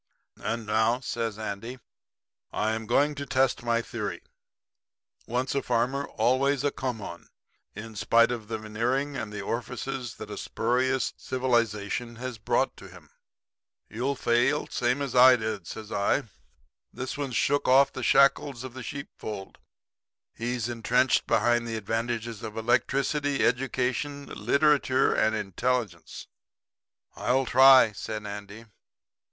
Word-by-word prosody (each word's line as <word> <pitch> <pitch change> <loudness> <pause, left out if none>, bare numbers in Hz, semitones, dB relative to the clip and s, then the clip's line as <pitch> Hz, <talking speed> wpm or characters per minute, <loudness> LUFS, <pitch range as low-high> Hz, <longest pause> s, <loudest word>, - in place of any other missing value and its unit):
And 115 +1 -3
now,' 110 +3 +2
says 115 -4 -3
Andy, 110 +3 -5 0.7
'I 110 +1 0
am 110 0 -4
going 145 +5 +3
to 140 -1 -6
test 130 -1 +1
my 115 -1 0
theory - - -5 1.0
"Once 125 +3 -1
a 140 - 0
farmer, 125 +3 0
always 135 +2 +1
a 145 - +1
come 125 -5 -4
on," 85 -2 -9 0.5
in 110 +2 -8
spite 115 +4 +4
of 115 -3 -5
the 110 - -3
veneering 120 +7 -2
and 105 - -4
the 105 -1 -5
orifices 125 +2 -4
that - - -9
a - - -5
spurious 130 +3 0
civilization 120 -2 -1
has 125 -1 -6
brought - - 0
to - - -11
him.' - - -16 0.8
"'You'll 125 +6 -1
fail, 125 +4 +2
same 125 +4 0
as 135 - -4
I 130 +1 +8
did,' 110 -6 -4
says 110 -1 -8
I. 100 +8 +1 0.7
'This 130 +1 -5
one's 140 -4 -4
shook 145 - +1
off 135 +2 +5
the 130 - -5
shackles 135 -1 +3
of 130 -2 -8
the 130 - -8
sheep 140 +3 -6
fold. 100 -3 -7 0.7
He's 120 -1 -3
entrenched 120 +2 +1
behind 120 -1 +2
the 115 -1 -3
advantages 115 +1 -3
of 110 0 -7
electricity, 135 +5 +1
education, 130 +3 -1
literature 135 +3 +2
and 110 0 +2
intelligence.' 105 -2 -2 0.9
"'I'll 130 +2 +1
try,' 130 -2 +7
said 105 +1 -6
Andy. 105 +2 -8
120 Hz, 135 wpm, -27 LUFS, 110-130 Hz, 1.0 s, I